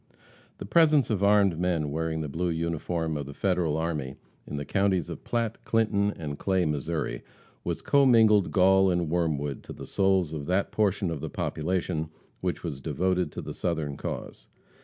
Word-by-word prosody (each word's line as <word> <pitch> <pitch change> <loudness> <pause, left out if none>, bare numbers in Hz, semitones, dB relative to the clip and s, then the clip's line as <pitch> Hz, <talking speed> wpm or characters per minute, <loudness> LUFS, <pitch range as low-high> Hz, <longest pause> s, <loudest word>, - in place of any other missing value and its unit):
The - - -7
presence 150 +1 +4
of 100 -2 0
armed 100 -4 +4
men 85 -5 0
wearing 80 +1 -2
the 75 - -3
blue 85 +5 -2
uniform 80 0 -2
of 70 -2 -4
the 70 - -9
Federal 90 -5 0
army 75 -5 -2 0.3
in 75 - -5
the 70 - -4
counties 95 -3 +1
of - - -8
Platte, 115 -2 -2
Clinton 105 -3 +1
and 75 -3 -5
Clay, 95 -2 +1
Missouri, 75 +1 -2 0.4
was - - -3
commingled 115 -8 +5
gall 95 0 +5
and 85 -3 0
worm 85 -3 +1
wood 70 -1 -4
to - - -8
the - - -9
souls 95 -4 +1
of 75 -2 -5
that 95 +2 +1
portion 100 -3 +1
of 75 -4 -4
the 80 - -4
population 80 0 -2 0.3
which - - -3
was 70 - -5
devoted 90 +1 0
to - - -6
the - - -6
Southern 80 -5 -2
cause. - - -6
85 Hz, 180 wpm, -27 LUFS, 80-100 Hz, 0.4 s, commingled